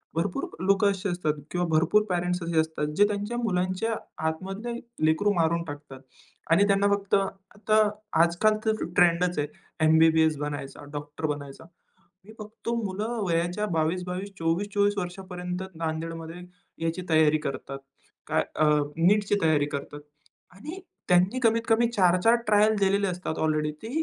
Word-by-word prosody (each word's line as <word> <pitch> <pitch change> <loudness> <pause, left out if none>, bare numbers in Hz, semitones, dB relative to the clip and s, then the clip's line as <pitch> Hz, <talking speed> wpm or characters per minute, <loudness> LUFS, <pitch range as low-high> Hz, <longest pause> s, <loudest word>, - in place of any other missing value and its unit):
भरपूर 175 +3 -1
अ, 170 - -10
लोकं 200 +1 +4
असे 195 0 -3
असतात 175 -4 0 0.2
किंवा 175 0 0
भरपूर 165 +6 +3
पेरेंट्स 180 0 -1
असे 165 -1 0
असतात, 160 -1 -1
जे 205 - +6
त्यांच्या 210 +3 -3
मुलांच्या 190 0 -1 0.3
आतमधले 195 +8 -4 0.3
लेकरू 160 +7 +3
मारून 170 -1 +1
टाकतात 145 -3 -9 0.5
आणि 170 +5 +6
त्यांना 200 0 +3
फक्त 200 -1 -1
आता 200 +2 0 0.4
आजकाल 215 +6 +2
तर 220 0 0
ट्रेंडच 175 -2 +3
आहे. 145 - 0 0.4
एम-बी-बी-एस 160 -1 +4
बनायचा, 145 -1 -5
डॉक्टर 150 +2 -5
बनायचा. 145 -2 -5 0.6
मी 220 - -13
फक्त 215 +2 -8
मुलं 210 +5 -3
वयाच्या 175 +4 0
22-22, 180 +4 -1
24-24, 205 +5 +1
वर्षापर्यंत 180 -1 -5
नांदेडमध्ये 165 +1 -5 0.4
याची 165 +3 -2
तयारी 155 -1 +4
करतात. 135 0 -6 0.5
काय - - +2
अ, 155 - +2 0.3
नीटची 205 +4 +3
तयारी 155 -3 +3
करतात 145 +1 -5 0.6
आणि 305 - -8 0.3
त्यांनी 180 +7 +3
कमीतकमी 230 +1 +3
4-4 185 +2 +4
ट्रायल 210 +1 +4
दिलेले 200 0 +2
असतात. 180 -3 -4
ऑलरेडी 155 -1 0
ते 225 - -6
180 Hz, 135 wpm, -26 LUFS, 160-205 Hz, 0.6 s, जे